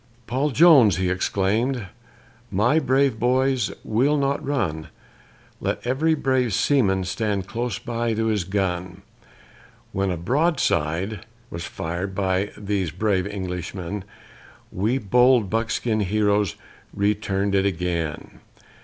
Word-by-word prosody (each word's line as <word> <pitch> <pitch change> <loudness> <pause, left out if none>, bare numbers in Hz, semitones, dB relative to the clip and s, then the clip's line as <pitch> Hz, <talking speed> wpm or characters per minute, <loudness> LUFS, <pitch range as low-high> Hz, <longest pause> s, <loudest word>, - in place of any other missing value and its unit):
Paul 135 +6 0
Jones 140 - +6
he 95 -2 0
exclaimed, 105 +6 0 0.6
"My 120 +11 +2
brave 135 -5 +2
boys, 130 +2 +1
we'll 130 +7 +2
not 140 0 0
run: 80 - -2 0.7
Let - - -3
every 150 +6 +2
brave 130 -6 +1
seaman 100 -10 +2
stand 100 +1 -2
close 120 +1 -3
to 115 -2 -2
his 105 -4 +1
gun;" 90 -1 -3 0.9
When 95 0 -1
a 90 - -2
broadside 100 - 0 0.2
was 85 0 -5
fired 90 +4 -4
by 95 +1 0
these 100 -4 -1
brave 95 +2 0
Englishmen, 95 0 -5 0.7
We 110 +8 0
bold 125 -1 +3
buckskin 115 0 0
heroes 105 -1 +1 0.4
return'd 100 -1 0
it 100 0 +3
again. 85 -4 -3
105 Hz, 110 wpm, -23 LUFS, 95-125 Hz, 0.9 s, Jones